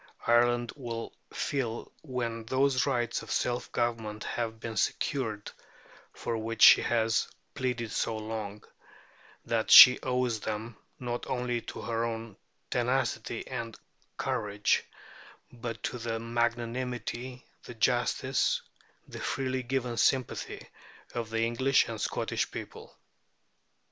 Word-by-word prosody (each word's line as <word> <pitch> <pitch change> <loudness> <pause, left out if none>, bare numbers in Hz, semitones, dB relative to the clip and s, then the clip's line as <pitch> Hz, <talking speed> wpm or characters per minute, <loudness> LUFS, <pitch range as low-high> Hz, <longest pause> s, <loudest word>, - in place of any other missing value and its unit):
Ireland 120 0 +3
will 120 -5 -5 0.2
feel, 120 -5 -3
when 120 -5 -3
those 130 +2 +2
rights 120 -3 0
of - - -11
self 120 0 -1
government 115 -3 -2
have 115 -2 -3
been 115 0 -5
secured 110 -1 -1 0.6
for 115 - -4
which 115 0 -1
she - - +10
has 115 -1 +1 0.3
pleaded 125 -4 -2
so 110 +3 -1
long, 110 -2 -5 0.8
that - - 0
she 125 - +11
owes 125 -3 0
them, 110 +2 -4 0.2
not 120 -1 -4
only 125 -2 -1
to - - -8
her 115 -1 -1
own 115 -2 -4 0.4
tenacity 125 +1 -1
and 115 -1 -5 0.4
courage, 105 0 0 0.7
but 115 -1 -6
to 125 - -3
the 115 -1 -2
magnanimity, 120 +1 -2 0.2
the 120 - -9
justice, 125 +3 +1 0.4
and - - -19
the - - -6
freely 130 -1 -1
given 125 -1 -2
sympathy 130 0 0 0.5
of 115 -2 -3
the 115 0 -1
English 130 +4 +3
and - - -5
Scottish - - -1
people. - - -9
120 Hz, 120 wpm, -29 LUFS, 115-125 Hz, 0.8 s, she